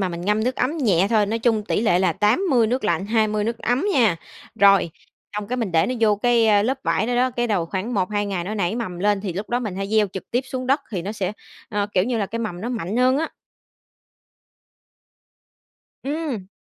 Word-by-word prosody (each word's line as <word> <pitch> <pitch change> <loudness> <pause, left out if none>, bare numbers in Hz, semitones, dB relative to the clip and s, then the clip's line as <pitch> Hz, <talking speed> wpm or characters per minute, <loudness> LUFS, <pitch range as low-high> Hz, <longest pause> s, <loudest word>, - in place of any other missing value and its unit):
mà 190 - 0
mình 170 -1 -6
ngâm 210 +4 0
nước 255 +1 -1
ấm 275 +6 0
nhẹ 195 - +3
thôi, 215 -2 +3
nói 225 +3 -1
chung 225 -2 +1
tỷ 205 - 0
lệ 180 -6 +3
là 185 -3 +2
80 235 - +2
nước 250 0 -1
lạnh, 200 -2 0
20 215 -1 +1
nước 230 +1 -2
ấm 250 - 0
nha. 220 -10 +3 0.4
Rồi, 195 -5 +5 0.5
xong 210 0 -4
cái 250 - -2
mình 220 -7 -2
để 165 +2 +3
nó 255 - -2
vô 210 -2 +4
cái, 235 +1 +3
ơ, 205 -1 +4
lớp 265 +4 0
vải 220 - +1
đó 245 - -1
đó, 255 +1 +2
cái 240 0 -1
đầu 190 -7 0
khoảng 205 +7 -3
1-2 205 +2 0
ngày 185 -4 -3
nó 210 +3 -4
nảy 195 +1 -1
mầm 185 -7 -4
lên 205 +1 +1
thì 195 -4 -4
lúc 200 +4 -5
đó 245 - +1
mình 210 -6 -4
hãy 195 0 -3
gieo 215 -1 +3
trực 190 - -8
tiếp 245 - +1
xuống 255 -1 -4
đất 275 +3 +2
thì 185 -6 -3
nó 200 +4 -4
sẽ, 195 -2 -3 0.4
ơ, 205 -1 -1
kiểu 185 +1 +3
như, 240 -1 -1
là 200 - 0
cái 230 +4 -5
mầm 205 -6 -4
nó 235 - -4
mạnh 220 -3 -3
hơn 255 +2 +3
á. 320 - -2 2.7
Ừm. 280 - -3
215 Hz, 235 wpm, -22 LUFS, 195-240 Hz, 2.7 s, Rồi